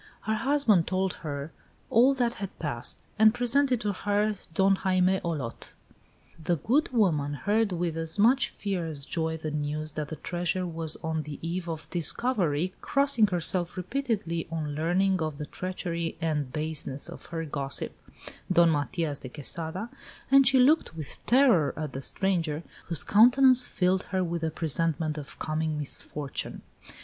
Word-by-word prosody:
Her 220 Hz, -, -1 dB
husband 225 Hz, -, +2 dB
told 190 Hz, 0 st, 0 dB
her 145 Hz, -1 st, -5 dB, 0.4 s
all 255 Hz, +4 st, +5 dB
that 240 Hz, -2 st, +1 dB
had 195 Hz, -, -6 dB
passed, 130 Hz, -7 st, -4 dB
and 220 Hz, +1 st, +6 dB
presented 250 Hz, +1 st, +2 dB
to 205 Hz, -1 st, -1 dB
her 205 Hz, +2 st, 0 dB, 0.2 s
Don 190 Hz, +3 st, +3 dB
Jaime 185 Hz, -1 st, +2 dB
Olot. 145 Hz, -9 st, -5 dB, 0.7 s
The 175 Hz, -, +1 dB
good 255 Hz, -, +1 dB
woman 155 Hz, -, +1 dB
heard 210 Hz, +5 st, +1 dB
with 170 Hz, -2 st, -2 dB
as 165 Hz, +2 st, -2 dB
much 240 Hz, +5 st, +4 dB
fear 190 Hz, -5 st, -3 dB
as 145 Hz, -3 st, -6 dB
joy 160 Hz, -1 st, -1 dB
the 155 Hz, -1 st, -5 dB
news 150 Hz, +1 st, -3 dB
that 150 Hz, -1 st, -3 dB
the 160 Hz, -, -6 dB
treasure 175 Hz, +2 st, -2 dB
was 165 Hz, -2 st, -2 dB
on 160 Hz, -1 st, -1 dB
the 150 Hz, -1 st, -7 dB
eve 175 Hz, 0 st, -3 dB
of 160 Hz, -1 st, -5 dB
discovery, 180 Hz, -, 0 dB
crossing 275 Hz, -6 st, +3 dB
herself 175 Hz, -1 st, +1 dB
repeatedly 195 Hz, -5 st, -2 dB
on 155 Hz, -3 st, -3 dB
learning 180 Hz, +4 st, +1 dB
of 155 Hz, -2 st, -2 dB
the 150 Hz, -, -5 dB
treachery 170 Hz, -1 st, -4 dB
and 150 Hz, -5 st, -1 dB
baseness 150 Hz, -2 st, -3 dB
of -, -, -10 dB
her 165 Hz, -1 st, -4 dB
gossip, 140 Hz, -2 st, -1 dB, 0.6 s
Don 170 Hz, -2 st, +5 dB
Matias 145 Hz, 0 st, -1 dB
de 130 Hz, -, -8 dB
Quesada, 160 Hz, -, -3 dB, 0.4 s
and 275 Hz, -1 st, +7 dB
she 265 Hz, +1 st, +5 dB
looked 275 Hz, -, +3 dB
with 155 Hz, -4 st, -7 dB
terror 235 Hz, -, +4 dB
at 155 Hz, -4 st, -4 dB
the 135 Hz, -, -5 dB
stranger, 170 Hz, -2 st, -1 dB, 0.2 s
whose 165 Hz, -3 st, +1 dB
countenance 250 Hz, +3 st, +6 dB
filled 185 Hz, 0 st, +1 dB
her 185 Hz, -1 st, 0 dB
with 170 Hz, -1 st, -3 dB
a 160 Hz, -, +1 dB
presentiment 160 Hz, -1 st, -1 dB
of 145 Hz, -, -9 dB
coming 155 Hz, 0 st, -2 dB
misfortune. 145 Hz, 0 st, -3 dB
170 Hz, 160 wpm, -28 LUFS, 155-205 Hz, 0.7 s, and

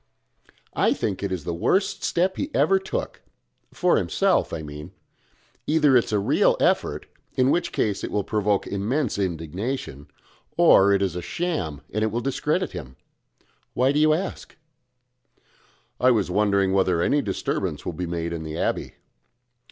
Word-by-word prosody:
"I -, -, +3 dB
think 95 Hz, -, -3 dB
it 100 Hz, -, -2 dB
is 90 Hz, -5 st, -3 dB
the 85 Hz, -, -3 dB
worst 190 Hz, -, 0 dB
step 185 Hz, +2 st, +1 dB
he 285 Hz, -, -3 dB
ever 195 Hz, 0 st, +4 dB
took 190 Hz, -, -5 dB, 0.5 s
for -, -, +2 dB
himself, -, -, +1 dB
I 80 Hz, -, -4 dB
mean. 75 Hz, 0 st, -9 dB, 0.7 s
Either 150 Hz, -3 st, +4 dB
it 120 Hz, -, +5 dB
is -, -, -7 dB
a 105 Hz, -, +2 dB
real 100 Hz, -, +2 dB
effort, -, -, +1 dB, 0.3 s
in 130 Hz, +1 st, +3 dB
which 175 Hz, -, 0 dB
case 105 Hz, -2 st, -1 dB
it -, -, -3 dB
will 105 Hz, -, -1 dB
provoke 105 Hz, -1 st, 0 dB
immense 110 Hz, +4 st, -1 dB
indignation 85 Hz, -, -4 dB, 0.5 s
or 100 Hz, +1 st, +6 dB
it 100 Hz, 0 st, +3 dB
is 95 Hz, -3 st, -1 dB
a 90 Hz, -, -3 dB
sham, 125 Hz, -, -3 dB
and 110 Hz, +1 st, 0 dB
will 115 Hz, -, -1 dB
discredit 150 Hz, +8 st, -1 dB
him. 65 Hz, -3 st, -8 dB, 0.8 s
Why 130 Hz, +2 st, +3 dB
do 145 Hz, -, +1 dB
you 155 Hz, 0 st, +5 dB
ask?" 180 Hz, +5 st, -3 dB, 1.4 s
"I 125 Hz, -, +4 dB
was 105 Hz, -7 st, +1 dB
wondering 100 Hz, -1 st, +2 dB
whether 90 Hz, -3 st, +2 dB
any 145 Hz, -, +2 dB
disturbance 100 Hz, -7 st, -3 dB
will -, -, -3 dB
be 90 Hz, +2 st, -4 dB
made 85 Hz, 0 st, -3 dB
in 85 Hz, -, -4 dB
the 80 Hz, 0 st, -6 dB
abbey." -, -, -2 dB
100 Hz, 160 wpm, -24 LUFS, 90-135 Hz, 1.4 s, or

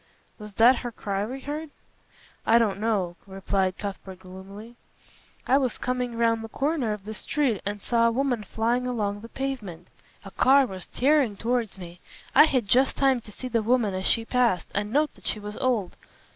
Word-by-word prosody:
"Was 210 Hz, -1 st, -10 dB
that 240 Hz, +5 st, +6 dB
her 240 Hz, -1 st, -5 dB
cry 200 Hz, -2 st, -3 dB
we 265 Hz, +3 st, -6 dB
heard?" 300 Hz, +3 st, -5 dB, 0.7 s
"I 230 Hz, -, +5 dB
don't 210 Hz, -4 st, +1 dB
know," 200 Hz, -6 st, -1 dB
replied 190 Hz, -1 st, -1 dB
Cuthbert 195 Hz, -2 st, -7 dB
gloomily. 195 Hz, +5 st, -11 dB, 0.7 s
"I 270 Hz, +2 st, +4 dB
was 255 Hz, -4 st, -1 dB
coming 250 Hz, -1 st, -2 dB
round 230 Hz, -1 st, +2 dB
the 225 Hz, -, -7 dB
corner 275 Hz, -3 st, -1 dB
of 210 Hz, -2 st, -6 dB
the 215 Hz, -, -5 dB
street 250 Hz, -1 st, -1 dB
and 205 Hz, 0 st, -3 dB
saw 230 Hz, +2 st, +2 dB
a -, -, +2 dB
woman 245 Hz, -2 st, 0 dB
flying 235 Hz, +4 st, -1 dB
along 205 Hz, -4 st, -2 dB
the 230 Hz, -, -10 dB
pavement. 220 Hz, -12 st, -5 dB, 0.4 s
A 195 Hz, -, -9 dB
car 270 Hz, +5 st, +5 dB
was 190 Hz, -6 st, -7 dB
tearing 270 Hz, -5 st, +2 dB
towards 230 Hz, -3 st, -1 dB
me. 175 Hz, -1 st, -10 dB, 0.3 s
I -, -, +8 dB
had 255 Hz, -8 st, 0 dB
just 260 Hz, +6 st, +3 dB
time 270 Hz, -3 st, +3 dB
to 215 Hz, -, -12 dB
see 255 Hz, -, -6 dB
the 230 Hz, -2 st, 0 dB
woman 225 Hz, -2 st, +1 dB
as 185 Hz, 0 st, -1 dB
she 230 Hz, -, +3 dB
passed 240 Hz, -7 st, +1 dB
and 205 Hz, +1 st, -2 dB
note 300 Hz, +4 st, +1 dB
that -, -, -13 dB
she 215 Hz, -, -2 dB
was 210 Hz, 0 st, -7 dB
old. 230 Hz, -8 st, 0 dB
230 Hz, 190 wpm, -26 LUFS, 200-250 Hz, 0.7 s, I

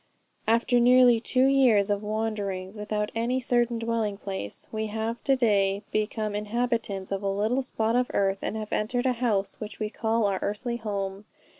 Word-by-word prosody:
"After 235 Hz, +2 st, +3 dB
nearly 245 Hz, -1 st, +6 dB
two 255 Hz, +3 st, +2 dB
years 245 Hz, -7 st, +4 dB
of 205 Hz, 0 st, 0 dB
wanderings 210 Hz, -3 st, -3 dB
without 210 Hz, 0 st, -2 dB
any 235 Hz, +3 st, 0 dB
certain 240 Hz, -1 st, +1 dB
dwelling 230 Hz, -3 st, -1 dB
place, 190 Hz, -, -6 dB
we 220 Hz, 0 st, -2 dB
have 220 Hz, +2 st, -3 dB
to 275 Hz, -, +4 dB
day 200 Hz, -5 st, +2 dB
become 215 Hz, 0 st, -1 dB
inhabitants 210 Hz, -2 st, -2 dB
of 195 Hz, 0 st, -1 dB
a 200 Hz, -, -1 dB
little 215 Hz, +7 st, +1 dB
spot 225 Hz, -3 st, -1 dB
of 250 Hz, 0 st, +2 dB
earth, 195 Hz, -1 st, +1 dB
and 220 Hz, -, -3 dB
have 215 Hz, -1 st, -5 dB
entered 245 Hz, +4 st, 0 dB
a 255 Hz, -, +3 dB
house 205 Hz, -5 st, 0 dB
which 215 Hz, 0 st, -7 dB
we 215 Hz, -1 st, -2 dB
call 225 Hz, -1 st, 0 dB
our 195 Hz, -2 st, 0 dB
earthly 235 Hz, +4 st, -2 dB
home. 200 Hz, -2 st, -4 dB
220 Hz, 175 wpm, -27 LUFS, 205-235 Hz, -, nearly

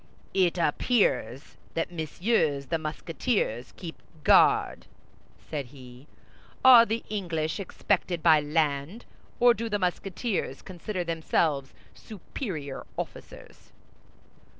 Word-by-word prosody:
"It 185 Hz, -2 st, +2 dB
appears 155 Hz, -, 0 dB, 0.2 s
that 165 Hz, +1 st, -1 dB
Messieurs 160 Hz, -3 st, 0 dB
the 165 Hz, -, 0 dB
Musketeers 155 Hz, -, -2 dB
keep 165 Hz, -3 st, -8 dB, 0.2 s
guard," -, -, +4 dB, 0.6 s
said 145 Hz, -4 st, -4 dB
he. 130 Hz, 0 st, -14 dB, 0.6 s
"Are 240 Hz, -3 st, +9 dB
the 225 Hz, +2 st, -2 dB
English 170 Hz, -5 st, -2 dB
expected 185 Hz, -2 st, -1 dB
by 160 Hz, -2 st, +6 dB
land, 150 Hz, +6 st, -1 dB, 0.3 s
or 245 Hz, 0 st, +6 dB
do 230 Hz, +1 st, -4 dB
the 205 Hz, -, 0 dB
Musketeers 185 Hz, -, -2 dB
consider 185 Hz, +1 st, -5 dB
themselves 160 Hz, -4 st, -1 dB, 0.2 s
superior 170 Hz, -, -7 dB
officers?" -, -, -9 dB
170 Hz, 100 wpm, -27 LUFS, 150-205 Hz, 0.6 s, Are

